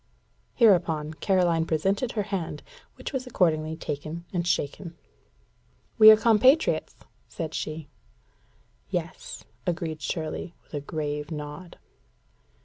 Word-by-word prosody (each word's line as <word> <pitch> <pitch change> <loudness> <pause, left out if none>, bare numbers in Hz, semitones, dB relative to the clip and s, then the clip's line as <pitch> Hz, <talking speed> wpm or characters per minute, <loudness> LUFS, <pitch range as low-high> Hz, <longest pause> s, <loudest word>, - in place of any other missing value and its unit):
Hereupon 170 -9 +3
Caroline 170 0 +2
presented 195 +9 0
her 210 - 0
hand, 195 -5 -4 0.3
which - - -7
was 260 -1 -3
accordingly 160 -8 +1
taken 155 +2 -5
and 175 -1 -1
shaken. 170 +2 -2 1.0
"We 215 0 +11
are 215 - +10
compatriots," 235 +7 +3 0.3
said 160 -4 -5
she. 155 -1 -4 1.0
"Yes," - - -5 0.2
agreed 165 -3 -2
Shirley, 160 +3 -4
with - - -29
a 145 - -2
grave 150 -1 -4
nod. 150 +2 -7
165 Hz, 110 wpm, -26 LUFS, 155-195 Hz, 1.0 s, We